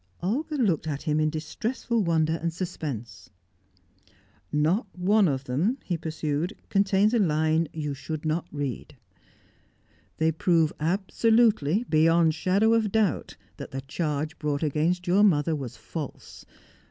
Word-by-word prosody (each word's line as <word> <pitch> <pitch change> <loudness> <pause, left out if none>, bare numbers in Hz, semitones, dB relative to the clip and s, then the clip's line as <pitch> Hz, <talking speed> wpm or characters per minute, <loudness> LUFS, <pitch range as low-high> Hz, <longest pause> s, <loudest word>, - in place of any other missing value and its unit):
Olga 290 - -1
looked 190 - +1
at 145 -2 -3
him 155 -2 +1
in 155 0 +2
distressful 215 +9 -2
wonder 160 -2 +1
and 170 0 -1
suspense. 155 - -6 1.2
"Not 160 +9 +1
one 200 +2 +3
of 135 -3 -1
them," 155 - 0
he 180 - -2
pursued, 160 +2 -3
"contains 200 +2 +3
a 235 - +3
line 160 -2 +2
that - - -17
you 150 -2 -3
should 155 +3 -6
not 160 +2 -1
read. 140 -6 -5 1.2
They 160 0 +2
prove 160 -1 +2
absolutely, 205 +2 +2
beyond 165 +1 +4
shadow 195 +7 +2
of 220 -3 +1
doubt, 215 -6 0 0.2
that - - -7
the 135 - -5
charge 150 +2 -3
brought 150 -1 -1
against 160 +4 0
your 185 +3 +3
mother 165 -6 +3
was 135 -5 -6
false. - - -8
165 Hz, 140 wpm, -26 LUFS, 150-195 Hz, 1.2 s, beyond